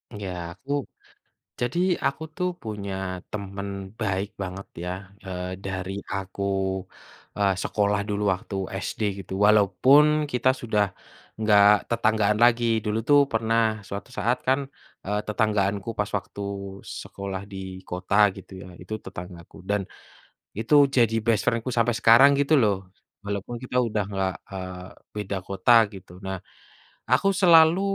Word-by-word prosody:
Ya, 100 -2 -5 0.3
aku 135 +8 -9 0.9
jadi 120 +8 0 0.3
aku 140 +3 -1
tuh 180 0 0
punya 105 -3 -5 0.4
temen 100 -1 -5 0.3
baik 100 -2 -1
banget 95 +1 -6 0.2
ya, 90 - -3 0.4
eee, 90 0 -5
dari 95 -1 -4 0.2
aku, 100 0 -4 0.9
eee, 100 -1 +3
sekolah 105 -1 +1
dulu 105 0 -1
waktu 95 +2 -7 0.3
SD - - -5 0.2
gitu, - - -7
walaupun 105 +8 +6 0.3
kita 125 +1 +2
sudah 110 -3 +2 0.6
nggak 105 -2 +6 0.2
tetanggaan 110 -2 +2
lagi. 120 0 +4 0.2
Dulu 105 +1 0
tuh 145 0 +7
pernah 115 -1 +1
suatu 100 +5 -6
saat 125 +2 +1
kan, 135 +2 +4 0.5
eee, 105 +2 0
tetanggaanku 105 -1 0
pas 105 - 0
waktu 100 +1 -9 0.6
sekolah 100 -1 -6
di 95 - -7 0.3
kota 90 +2 -2 0.2
gitu 95 0 -12
ya 95 - -10
itu 90 +4 -7
tetanggaku, 90 -1 -9
dan 105 0 +2 0.8
itu 115 +5 -1 0.2
jadi 115 -2 +4
best 115 -3 +2
friend-ku 115 +2 0
sampai 115 +1 +3
sekarang 120 +4 +7
gitu 145 +2 +1
loh. 105 -3 +3 0.5
Walaupun 100 +3 -4
kita 125 0 -3
udah 105 -2 -1
nggak, 95 -2 -1 0.2
eee, 95 -1 -7 0.3
beda 105 -1 -3
kota 100 +5 +2 0.2
gitu. 95 -2 -12
Nah, 95 0 -3 0.7
aku 130 +10 +4
selalu, 165 0 +7
105 Hz, 135 wpm, -25 LUFS, 95-115 Hz, 0.9 s, tuh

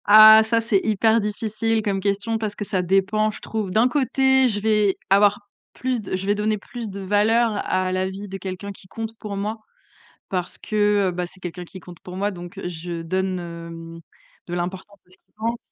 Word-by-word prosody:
Ah, 215 +1 +10
ça 230 +1 +1
c'est 220 -4 +2
hyper 220 +1 +3
difficile 220 +1 -1
comme 200 -2 0
question 205 +3 -1
parce 215 -2 -3
que 205 - -4
ça 190 -2 0
dépend, 195 +4 +2
je 210 - -7
trouve. 215 -3 -3
D'un 220 +6 +4
côté 265 -1 +3
je 210 -4 -1
vais 210 -2 +2 0.2
avoir 205 +1 +4 0.3
plus 255 -2 -2
de 195 - -3
je 185 +1 -4
vais 205 - +3
donner 210 +1 0
plus 230 +2 -7
de 200 0 -7
valeur 215 +4 +3 0.2
à 185 0 0
l'avis 190 +2 -2
de 195 0 -6
quelqu'un 190 +1 -6
qui 190 -1 -14
compte 225 +3 -6
pour 205 -2 -5
moi 210 +3 -3 0.7
parce 180 -2 -3
que, 205 -2 +2
heu, - - -2
bah, 180 0 -3
c'est 180 +2 -14
quelqu'un 180 0 -6
qui 185 - -11
compte 175 -1 -13
pour 180 - -9
moi 200 +2 0
donc, 175 -3 -9
heu, - - -4
je 170 0 -5
donne, 185 +2 -1
hem, 165 -1 -8 0.4
de 175 - -7
l'importance 185 +3 -5
conséquence. 220 +5 -6
200 Hz, 200 wpm, -23 LUFS, 185-220 Hz, 0.7 s, Ah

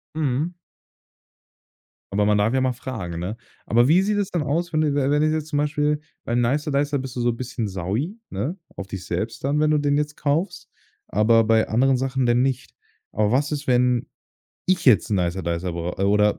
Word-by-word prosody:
Mhm. 155 +3 -1 1.6
Aber 105 +1 +2
man 105 0 +3
darf 105 +4 +2
ja 130 - +2
mal 130 -1 +1
fragen, 110 -10 -6
ne? 95 +7 -4 0.3
Aber 120 +3 +4
wie 180 +5 +5
sieht 205 0 0
es 200 - -1
denn 170 -4 0
aus, 165 +5 -1
wenn 155 -1 +1
du 150 -2 +1
we 140 -1 +1
wenn 145 - +3
du 155 - +3
jetzt 155 -1 -2
zum 150 -2 -2
Beispiel 150 0 +1 0.3
beim 120 +1 +1
Nicer 145 +6 0
Dicer 140 0 +1
bist 130 -1 -7
du 125 - -2
so 120 - +2
'n 115 - -7
bisschen 125 -3 -3
saui, 100 - -3
ne, 120 - -3 0.2
auf 100 - -6
dich 95 -2 -6
selbst 110 +8 -3
dann, 145 +2 +1
wenn 155 0 +3
du 150 - +3
den 145 0 +1
jetzt 150 0 -2
kaufst. 150 +6 -1 0.4
Aber 115 +3 +4
bei 110 0 +3
anderen 130 +4 +3
Sachen, 135 0 -1
dann 120 +2 +3
nicht. 130 -1 -2 0.4
Aber 105 +1 +1
was 140 +3 +1
ist, 150 -1 -3
wenn 125 -1 +2 0.6
ich 185 -1 +1
jetzt 120 -3 +5
'n 100 - +3
Nicer 90 0 -1
Dicer 85 +1 -2
brau 85 +1 -3
äh, 95 - -1
oder 105 +1 +3
130 Hz, 215 wpm, -23 LUFS, 105-150 Hz, 1.6 s, wie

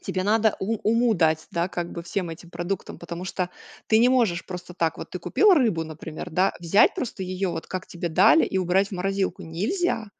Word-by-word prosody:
Тебе 185 - -3
надо 215 +2 +3
у 220 +4 -1
уму 230 +1 +3
дать, 160 -2 +1
да, 170 0 0
как 175 -1 -4
бы, 170 - -6
всем 180 -1 -3
этим 170 +1 -10
продуктам, 175 +2 -4
потому 170 +1 -6
что 180 -1 -3 0.4
ты 220 - +5
не 240 - +5
можешь 225 -10 +1
просто 180 -1 -7
так. 165 -2 -1
Вот - - -8
ты - - -5
купил 420 -1 +4
рыбу, 225 - +2
например, 160 +2 -8
да, 185 +4 +2
взять 175 +4 +4
просто 230 -6 -4
ее, 185 +1 -2
вот, 165 -1 -5
как 185 -1 -5
тебе 175 0 -4
дали, 195 - +5
и 190 - -1
убрать 190 +2 +2
в - - -16
морозилку 195 +1 -2
нельзя. 225 - -1
185 Hz, 210 wpm, -25 LUFS, 170-215 Hz, 0.4 s, ты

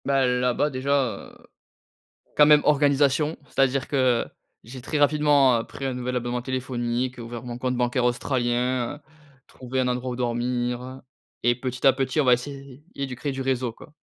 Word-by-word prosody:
Ben, 135 -1 +2 0.2
là-bas 125 +4 +1
déjà? 130 +1 -3 0.4
Heu. - - -18 1.0
Quand 150 - +7
même, 150 -1 +7
organisation. 145 +1 +2
C'est-à-dire 135 0 +1
que 130 -4 +2 0.4
j'ai 125 +3 -10
très 140 +5 -3
rapidement 145 -4 +4
pris 135 - -8
un 135 - -1
nouvel 125 0 -3
abonnement 120 0 -2
téléphonique, 125 -1 -3
ouvert 115 0 -7
mon 120 -1 -6
compte 125 0 -1
bancaire 125 +1 0
australien. 125 0 0
heu, - - -14 0.5
trouvé 130 +1 -5
un 130 - +1
endroit 125 0 -2
où - - -4
dormir 125 +1 -2 0.4
et 120 - +4
petit 125 0 -4
à 135 - +7
petit, 130 +3 -1
on 145 - +3
va 125 - +6
essayer 135 +2 -5
de 135 -2 -4
créer 140 +3 -3
du 135 0 -4
réseau, 130 -2 -1
quoi. 145 - -16
130 Hz, 170 wpm, -24 LUFS, 125-135 Hz, 1.0 s, Quand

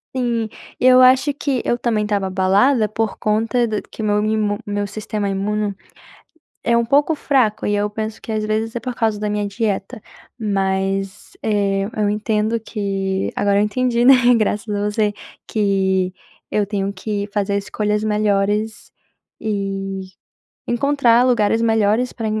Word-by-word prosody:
Sim. 235 -3 0 0.3
Eu 255 0 +6
acho 260 +3 +5
que 275 -2 -2
eu - - +2
também 235 -3 0
estava 205 -2 -1
abalada 200 +6 +3
por 215 0 -2
conta 225 +3 +1
do 215 -2 -2
que 220 - -9
meu 210 -1 +2
mimo 215 -1 0
meu 205 0 -2
sistema 210 0 -4
imuno 200 +1 -1 0.9
é 235 - +3
um 235 0 +2
pouco 290 +5 +3
fraco 255 -8 +1
e 205 - +1
eu 205 0 0
penso 215 +1 -5
que, 225 - -5
às 215 0 -1
vezes, 220 +2 -1
é 235 - -3
por 250 0 -5
causa 220 -3 0
da 210 - -1
minha 205 0 -1
dieta, 200 -1 -3 0.4
mas, 195 -2 -2
eh, 200 -2 +1
eu 210 -1 +1
entendo 215 +2 0
que 195 -3 -2
agora 200 0 +2
eu 205 - +4
entendi, 240 +2 0
né, 270 - +9 0.2
graças 210 -1 0
a 205 - -1
você, 210 -1 0 0.3
que 190 -3 +1 0.4
eu 210 - +1
tenho 200 -1 -2
que 200 +1 -4
fazer 200 -1 0
escolhas 210 +1 -1
melhores 210 +1 0 0.5
e 195 -2 -3 0.6
encontrar 245 -2 +3
lugares 225 -2 +2
melhores 225 +2 +2
pra 225 -3 -4
210 Hz, 155 wpm, -20 LUFS, 200-230 Hz, 0.9 s, né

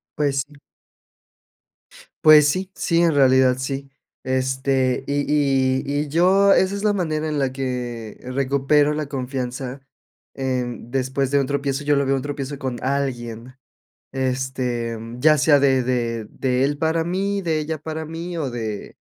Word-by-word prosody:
Pues 140 -2 0
sí. 145 -1 -19 1.6
Pues 150 -1 +8
sí, 185 +4 -2
sí, 170 -1 +1
en 165 -3 +3
realidad, 130 -2 +4
sí. 135 +1 -4 0.3
Este, 130 0 0
Y 145 0 0
y 135 -3 +2 0.2
y 150 - -4
yo 190 +6 +4
esa 190 +1 +2
es 200 - -5
la 210 -1 +3
manera 160 -5 -1
en 150 -1 -1
la 135 -2 0
que 125 -4 -5
recupero 140 +3 +1
la 150 -1 -3
confianza. 130 -1 -4 0.5
Eh, 130 -2 -1 0.2
después 130 +2 -2
de 140 - +3
un 135 - 0
tropiezo, 140 0 -2
yo 145 0 +2
lo 140 0 +1
veo 135 - +1
en 135 - +1
un - - -3
tropiezo 145 0 -5
con 130 -2 -3
alguien. 125 -3 -3 0.6
Este, 125 -3 -2 0.2
ya 150 +3 +4
sea 145 0 +5
de 135 -2 +3
de 120 -3 -1
de 130 0 0
él 145 +1 0
para 160 +1 +1
mí, 195 +3 -1
de 165 -3 0
ella 155 0 -3
para 160 +1 -5
mí, 165 +2 -6
o 140 -5 -2
de 110 -4 -5
135 Hz, 160 wpm, -22 LUFS, 130-150 Hz, 1.6 s, Pues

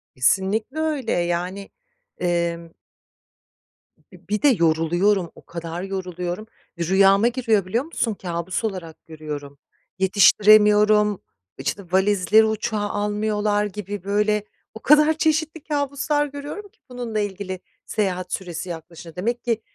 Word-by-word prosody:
Kesinlikle 200 - +1
öyle. 300 -7 -1
Yani, 175 +3 -2 0.5
emm. 170 -1 -1 1.4
Bi 180 -1 -17
bir 210 0 -1
de 295 - +5
yoruluyorum, 175 - +2
o - - -17
kadar 170 +1 -6
yoruluyorum. 180 0 -4 0.3
Rüyama 195 +5 +4
giriyor, 230 -5 +1
biliyor 230 +7 -1
musun, 245 -8 -2
kâbus 175 0 -4
olarak 185 -7 -5
görüyorum. 150 -3 -8 0.4
Yetiştiremiyorum, 210 +1 +5 0.4
işte, 140 +9 -3
valizleri 200 +2 +4
uçağa 220 0 -1
almıyorlar 210 0 0
gibi 205 -1 -6
böyle, 210 +1 +1 0.3
o 220 - -9
kadar 300 +3 +5
çeşitli 315 0 0
kâbuslar 290 0 0
görüyorum 290 +8 -7
ki 455 - -37
bununla 240 -3 -4
ilgili 190 -2 -4 0.3
seyahat 185 -3 -2
süresi 180 -1 -5
yaklaşın 165 0 -9
Demek 235 +6 -2
ki, 230 -2 -1
205 Hz, 115 wpm, -22 LUFS, 180-220 Hz, 1.4 s, de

